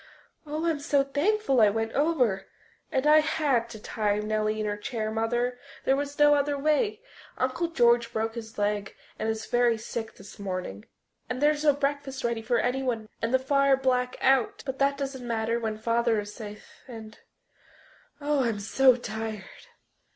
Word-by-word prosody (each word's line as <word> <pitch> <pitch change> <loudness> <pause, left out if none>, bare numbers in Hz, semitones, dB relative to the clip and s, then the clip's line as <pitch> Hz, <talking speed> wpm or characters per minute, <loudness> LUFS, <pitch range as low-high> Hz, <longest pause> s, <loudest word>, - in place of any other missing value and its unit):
"Oh, 305 +3 -3
I'm 325 -3 +1
so 285 -1 +2
thankful 285 - +1
I 210 - +7
went 225 +2 -2
over. 270 -10 +1 0.4
And 265 +1 0
I 305 +1 +7
had 290 -7 +1
to 220 -2 -9
tie 210 -1 -1
Nellie 215 0 -1
in 215 - -1
her 205 0 -1
chair, 215 +1 -4
Mother, 240 +3 -1 0.3
there 270 - +4
was 285 +1 -4
no 295 0 +6
other 285 0 +1
way. 410 - +1 0.3
Uncle 260 +7 0
George 235 -6 +3
broke 225 0 -2
his 225 -1 -8
leg 205 -1 -1 0.2
and 220 - -1
is 220 0 -3
very 240 -1 +2
sick 225 0 -6
this 200 +2 -13
morning, 185 - -5 0.4
and 250 0 -3
there's 295 +1 +2
no 295 -2 +5
breakfast 280 -1 -2
ready 235 -1 -1
for 240 +2 +1
anyone 245 -3 -1
and 230 - -1
the 260 - +5
fire 275 +1 +3
black 250 -1 0
out... 265 -3 +2
but 265 -1 -4
that 280 0 +2
doesn't 270 -3 -5
matter 230 0 0
when 220 -2 -3
Father 230 0 +1
is 205 0 -6
safe... 210 -2 -11
and 225 -3 -10 1.0
oh, 290 -2 +1
I'm 230 -4 -1
so 255 +5 +4
tired!" 220 -3 -5
240 Hz, 175 wpm, -27 LUFS, 220-275 Hz, 1.0 s, I